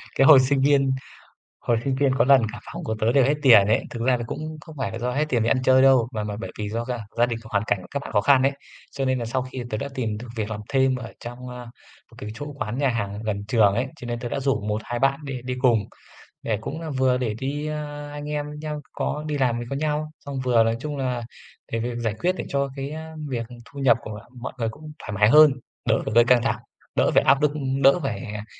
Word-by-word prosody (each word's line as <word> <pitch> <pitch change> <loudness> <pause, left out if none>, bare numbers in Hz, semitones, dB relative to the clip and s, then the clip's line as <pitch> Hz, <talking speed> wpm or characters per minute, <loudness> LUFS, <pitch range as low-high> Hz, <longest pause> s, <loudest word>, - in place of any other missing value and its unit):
Cái 135 - +4
hồi 145 -4 +10
sinh 135 +1 +2
viên 135 -1 +4 0.7
hồi 120 - +1
sinh 135 -1 0
viên 135 -1 +2
có 120 - +4
lần 135 -1 +6
cả - - -7
phòng - - -6
của 110 - -2
tớ 110 +2 +2
đều 135 -1 +5
hết 145 +3 +2
tiền 115 -8 +7
ấy, 110 - +2
thực 120 - -6
ra 125 +1 +3
là 120 - -4
cũng 155 +4 -5
không 160 -2 -12
phải 130 - -2
là 115 - -5
do 125 +1 -1
hết 150 +4 +1
tiền 120 -5 +2
đi 115 - +1
ăn 130 - +2
chơi 130 0 +5
đâu 130 -3 +5
mà 105 -1 -2
mà 105 -1 -4
bởi - - -6
vì 105 -1 -2
do 115 +2 -3
gia 125 -1 -3 0.2
gia 120 - +5
đình 120 -2 -3
hoàn 105 -2 -1
cảnh 100 - +1
của 90 - -12
các 140 - -2
bạn - - -8
khó 105 - +4
khăn 130 +3 +5
ấy. 135 - +4 0.4
Cho 135 -1 -2
nên 130 -1 +1
là 115 - -3
sau 130 +3 -1
khi 130 0 -6
tớ 110 - -2
đã 140 - -3
tìm 110 -5 -2
được 120 +3 -8
việc 110 -1 -2
làm 105 - -4
thêm 135 -1 +3
ở 120 -2 -7
trong, 125 +1 -8
a, 125 0 -8 0.5
một - - -16
cái 105 - -6
chỗ 145 +6 -7
quán 110 -2 -4
nhà 140 -1 +2
hàng 105 -2 -3
gần 100 -2 -3
trường 105 -4 +4
ấy, 125 +4 0
cho - - -10
nên 120 0 -3
tớ 120 - -4
đã 140 - -2
rủ 135 -5 0
một 105 +1 -2
hai 120 0 -3
bạn 135 +2 +2
đi 135 -3 -4
đi 125 0 -3
cùng, 115 -5 +4 0.6
để 110 -3 -1
cũng 150 +8 -5
là 160 -1 -5
vừa 130 -2 +2
để 115 -4 -1
đi 145 +4 -3
à, 145 -1 -5
anh 145 0 -6
em 150 -1 -2
với 150 - -8
nhau 150 -1 -4
có 150 +1 -3
đi 150 -1 -2
làm 120 -3 +1
có 140 - -2
nhau, 155 +1 -1
xong 140 -1 -5
vừa, 120 -3 +4
nói 115 0 +1
chung 150 +1 -4
là, 125 -3 -2 0.5
để 115 - 0
việc 120 +1 -3
giải 115 -3 -1
quyết 180 +6 +1
để - - -3
cho 140 0 0
cái, 135 +1 -4
a, 160 +1 -7
việc 120 -4 -3 0.2
thu 140 - -13
nhập 130 -4 +5
của 105 -1 -7 0.2
mọi 120 - -5
người 115 - 0
cũng 150 +7 -9
thoải 105 - -7
mái 105 +2 +4
hơn, 150 0 +8 0.4
đỡ - - +4
phải 110 - -3
gây 120 0 +7
căng 125 -1 +4
thẳng, - - 0 0.4
đỡ - - +3
phải - - +6
áp 140 - +4
lực, 150 - +4 0.3
đỡ 140 +6 +6
phải, 140 - -2
à, 105 -1 -6
130 Hz, 280 wpm, -24 LUFS, 115-140 Hz, 0.7 s, hồi